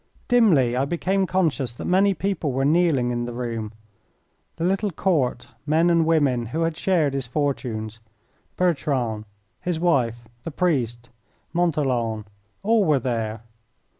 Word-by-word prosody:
Dimly 170 Hz, -, +4 dB
I 130 Hz, +2 st, +1 dB
became 185 Hz, +5 st, 0 dB
conscious 150 Hz, -10 st, 0 dB
that -, -, -7 dB
many 195 Hz, +2 st, +3 dB
people 195 Hz, -7 st, -1 dB
were 135 Hz, +1 st, 0 dB
kneeling 150 Hz, -6 st, +2 dB
in 120 Hz, 0 st, -2 dB
the 120 Hz, -, -5 dB
room; 115 Hz, -3 st, -4 dB, 0.8 s
the 165 Hz, -, -4 dB
little 195 Hz, +4 st, +1 dB
Court, 155 Hz, -9 st, 0 dB, 0.2 s
men 165 Hz, +3 st, +3 dB
and 165 Hz, -1 st, +3 dB
women, 140 Hz, -8 st, +2 dB
who 155 Hz, +8 st, -3 dB
had 165 Hz, -1 st, -1 dB
shared 160 Hz, -6 st, +1 dB
his 135 Hz, -3 st, -2 dB
fortunes, 115 Hz, -6 st, -2 dB, 0.6 s
Bertrand, 135 Hz, -10 st, 0 dB, 0.3 s
his 175 Hz, -3 st, -2 dB
wife, 120 Hz, -9 st, +1 dB, 0.2 s
the -, -, -4 dB
priest, 125 Hz, -8 st, -1 dB, 0.4 s
Montholon 130 Hz, -11 st, 0 dB, 0.4 s
all 220 Hz, +1 st, +3 dB
were 155 Hz, -6 st, +3 dB
there. 115 Hz, -4 st, -2 dB
145 Hz, 135 wpm, -23 LUFS, 120-175 Hz, 0.8 s, Dimly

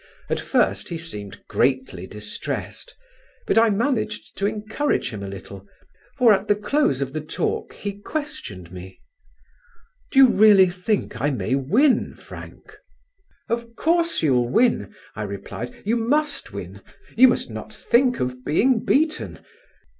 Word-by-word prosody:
At -, -, +1 dB
first -, -, 0 dB
he 170 Hz, -, -3 dB
seemed 105 Hz, -, -8 dB
greatly 130 Hz, -9 st, 0 dB
distressed; 105 Hz, -, -6 dB, 0.5 s
but -, -, +4 dB
I 230 Hz, 0 st, +5 dB
managed 215 Hz, 0 st, -1 dB
to 200 Hz, -, +2 dB
encourage 215 Hz, -, -1 dB
him 105 Hz, -3 st, -6 dB
a 100 Hz, -, -5 dB
little, 100 Hz, 0 st, -9 dB, 0.5 s
for 240 Hz, -5 st, +6 dB
at 195 Hz, +1 st, 0 dB
the 205 Hz, -, +4 dB
close 210 Hz, -, +1 dB
of 135 Hz, -1 st, -3 dB
the 155 Hz, -, -3 dB
talk 155 Hz, -, -3 dB
he 205 Hz, -, -4 dB
questioned 110 Hz, -, -6 dB
me: 95 Hz, +1 st, -10 dB, 1.1 s
"Do -, -, -4 dB
you 270 Hz, -2 st, +9 dB
really 200 Hz, -4 st, +6 dB
think 180 Hz, -, -2 dB
I 145 Hz, -, +2 dB
may 130 Hz, -2 st, -2 dB
win, 215 Hz, -, +2 dB
Frank?" -, -, -12 dB, 0.7 s
"Of 235 Hz, 0 st, -3 dB
course 335 Hz, -, +1 dB
you'll 125 Hz, -5 st, +2 dB
win," 230 Hz, -, +2 dB, 0.2 s
I -, -, -5 dB
replied. 105 Hz, +4 st, -6 dB
"You 225 Hz, +3 st, +2 dB
must 290 Hz, +6 st, 0 dB
win: -, -, -8 dB, 0.3 s
you 255 Hz, +3 st, +8 dB
must 245 Hz, -, 0 dB
not -, -, -7 dB
think 250 Hz, +1 st, +2 dB
of 125 Hz, 0 st, -3 dB
being 225 Hz, -, +2 dB
beaten. 310 Hz, +2 st, +1 dB
205 Hz, 145 wpm, -23 LUFS, -, 1.1 s, you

